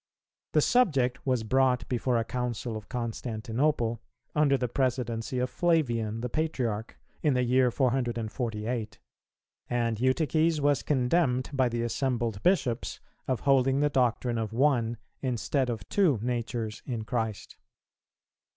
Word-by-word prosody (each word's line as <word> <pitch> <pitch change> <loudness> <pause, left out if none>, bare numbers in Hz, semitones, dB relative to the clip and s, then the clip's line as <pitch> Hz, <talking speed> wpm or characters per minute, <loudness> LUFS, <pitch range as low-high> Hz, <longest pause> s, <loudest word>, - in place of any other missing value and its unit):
The 150 - +5
subject 140 - +2
was 125 -3 +1
brought 125 -1 +2
before 125 0 0
a 115 - +1
Council 120 -1 -3
of 110 -1 -8
Constantinople, 115 +1 -1 0.3
under 145 -2 +3
the 125 - -1
presidency 120 -2 -1
of 125 0 -1
Flavian, 120 -10 +1
the 125 - -1
Patriarch, 120 -7 -2 0.2
in 145 -4 +2
the 125 - +2
year 125 +1 +3
448; 115 -3 -1 0.7
and 115 -2 0
Eutyches 155 +5 +2
was 145 -2 +2
condemned 130 -1 +1
by 130 -2 +2
the 120 0 -2
assembled 120 -4 -1
Bishops 140 -11 +1 0.3
of 130 -2 -1
holding 135 0 +3
the 145 0 +2
doctrine 120 -2 +1
of 110 -1 -3
One, 120 -3 +2 0.2
instead 130 +1 0
of 110 -5 -4
Two 180 - +3
Natures 120 -2 -3
in 120 -4 -3
Christ. 110 -3 -3
125 Hz, 130 wpm, -28 LUFS, 115-135 Hz, 0.7 s, The